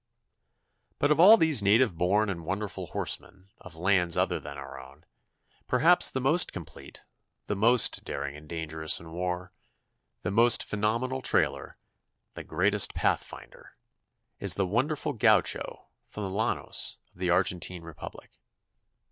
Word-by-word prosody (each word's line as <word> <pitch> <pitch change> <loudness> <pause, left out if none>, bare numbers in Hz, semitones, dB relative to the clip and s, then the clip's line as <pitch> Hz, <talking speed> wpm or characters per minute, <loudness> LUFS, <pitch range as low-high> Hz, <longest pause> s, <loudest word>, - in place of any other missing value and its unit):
But 145 - +1
of 150 - +2
all 205 +6 +9
these 160 - +2
native 105 0 +3
born 100 +6 +1
and 90 -4 -5
wonderful 100 +4 -5
horsemen 95 +1 -4
of 90 -2 -13
lands 90 0 +1
other - - 0
than 70 -1 -9
our - - -9
own, 65 +3 -16 0.6
perhaps 165 +8 +4
the 130 - -3
most 155 +7 +2
complete, 80 -6 -11 0.4
the 105 - -3
most 115 +4 +3
daring 70 0 -5
and 75 0 -14
dangerous 80 -1 -1
in 80 0 -13
war, 90 +1 -4 0.7
the - - -2
most 115 +2 +4
phenomenal 115 +5 -2
trailer, - - -1 0.6
the - - -8
greatest 95 +4 +1
pathfinder, - - -4 0.6
is - - +3
the 100 - 0
wonderful 145 - -1
Gaucho 110 - +1 0.2
from 105 - -7
the 95 - -4
llanos 110 +4 -1 0.2
of - - -22
the 90 -1 -1
Argentine 90 0 -1
Republic. 85 -2 -11
95 Hz, 140 wpm, -27 LUFS, 85-120 Hz, 0.7 s, all